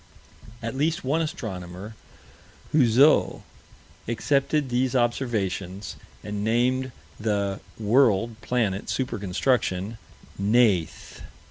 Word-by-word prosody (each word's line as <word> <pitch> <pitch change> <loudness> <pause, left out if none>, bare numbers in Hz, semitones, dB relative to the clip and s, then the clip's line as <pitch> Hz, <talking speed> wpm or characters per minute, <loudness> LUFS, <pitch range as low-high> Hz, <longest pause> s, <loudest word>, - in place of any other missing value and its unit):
At 115 +3 -3
least 155 +4 0
one 145 +5 +1
astronomer, 95 - -5 0.8
Houzeau, 135 +1 +4 0.6
accepted 140 +4 +1
these 125 +1 0
observations 100 -6 -1 0.3
and 105 0 -4
named 125 +4 +1 0.3
the 100 -2 -1 0.2
world, 115 0 +2
planet, 110 -6 -1
super 130 -5 -2
construction 100 +1 0 0.4
"Neith." 100 -5 +1
115 Hz, 85 wpm, -25 LUFS, 100-130 Hz, 0.8 s, Houzeau